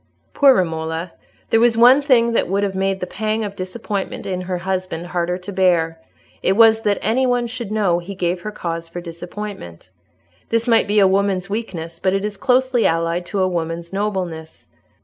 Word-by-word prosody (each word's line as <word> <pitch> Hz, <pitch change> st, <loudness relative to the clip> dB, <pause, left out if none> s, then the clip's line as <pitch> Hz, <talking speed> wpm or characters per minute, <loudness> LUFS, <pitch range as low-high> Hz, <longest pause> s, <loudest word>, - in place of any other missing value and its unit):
Poor 275 Hz, -2 st, +6 dB
Romola! 160 Hz, -1 st, -2 dB, 0.4 s
There 225 Hz, -, +5 dB
was 230 Hz, -1 st, +3 dB
one 250 Hz, +4 st, +7 dB
thing 245 Hz, -5 st, +3 dB
that -, -, +1 dB
would 195 Hz, +3 st, 0 dB
have 195 Hz, -1 st, -1 dB
made 190 Hz, 0 st, -1 dB
the -, -, -1 dB
pang 215 Hz, +3 st, -2 dB
of 200 Hz, -1 st, -5 dB
disappointment 200 Hz, +1 st, -4 dB
in 185 Hz, -1 st, -3 dB
her 180 Hz, 0 st, -3 dB
husband 185 Hz, -2 st, -3 dB
harder 175 Hz, 0 st, -2 dB
to 185 Hz, +2 st, -8 dB
bear; 170 Hz, -4 st, +1 dB, 0.4 s
it 190 Hz, -, +2 dB
was, 225 Hz, +1 st, +5 dB
that 205 Hz, -2 st, +1 dB
any 250 Hz, +5 st, +2 dB
one 245 Hz, -1 st, +1 dB
should 235 Hz, -3 st, -6 dB
know 200 Hz, -5 st, +1 dB
he 190 Hz, +3 st, -8 dB
gave 175 Hz, -1 st, -1 dB
her 215 Hz, -, -5 dB
cause 165 Hz, -4 st, -5 dB
for 175 Hz, -, -6 dB
disappointment. 175 Hz, -, -8 dB, 0.6 s
This 230 Hz, +1 st, 0 dB
might 230 Hz, -3 st, +4 dB
be 205 Hz, +1 st, 0 dB
a 200 Hz, -2 st, +6 dB
woman's 195 Hz, 0 st, 0 dB
weakness, 170 Hz, -7 st, -5 dB
but 185 Hz, -, +1 dB
it 195 Hz, +1 st, 0 dB
is 210 Hz, -1 st, -4 dB
closely 255 Hz, +1 st, +2 dB
allied 165 Hz, +1 st, -1 dB
to 195 Hz, -2 st, 0 dB
a -, -, +2 dB
woman's 170 Hz, 0 st, -4 dB
nobleness. 185 Hz, -6 st, -4 dB
190 Hz, 190 wpm, -20 LUFS, 175-220 Hz, 0.6 s, one